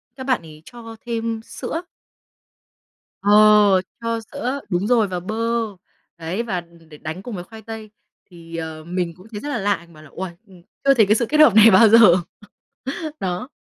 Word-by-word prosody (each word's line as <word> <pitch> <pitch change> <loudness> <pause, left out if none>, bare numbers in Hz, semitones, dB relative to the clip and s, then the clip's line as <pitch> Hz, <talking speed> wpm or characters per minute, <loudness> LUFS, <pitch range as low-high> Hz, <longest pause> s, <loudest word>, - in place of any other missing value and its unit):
các 260 - -7
bạn 255 -8 +1
ấy 155 -2 -14
cho 230 -2 -11
thêm 230 -1 -3
sữa. 325 +7 -5 1.4
Ờ, 210 -2 +6 0.2
cho 230 0 -2
sữa 280 0 -3
đúng 180 +4 -1
rồi 235 -4 +3
và 180 -2 -4
bơ, 210 +5 -5 0.8
đấy, 170 +7 -3
và 190 -7 -3
đ - - -20
đ - - -21
để 150 - -13
đánh 160 +5 -7
cùng 235 -2 -6
với 175 - -6
khoai 220 +4 -13
tây 220 0 -9 0.4
thì, 170 -2 -12
ờ, 160 -1 -6
mình 175 0 -3
cũng 185 +4 -16
thấy 210 - -6
rất 290 - -6
là 285 - -2
lạ, 200 0 +1
mình 170 0 -18
bảo 155 0 -15
là 150 - -15
"Uầy! 185 -1 -5 0.2
Ưm, 185 -3 -17 0.2
chưa 275 0 +5
thấy 225 -5 +4
cái 210 +2 +3
sự 235 - +1
kết 305 - +1
hợp 290 -9 +7
này 220 +1 +8
bao 210 +3 +7
giờ." 230 +2 +7 1.2
Đó. 185 +8 -3
210 Hz, 200 wpm, -21 LUFS, 175-230 Hz, 1.4 s, này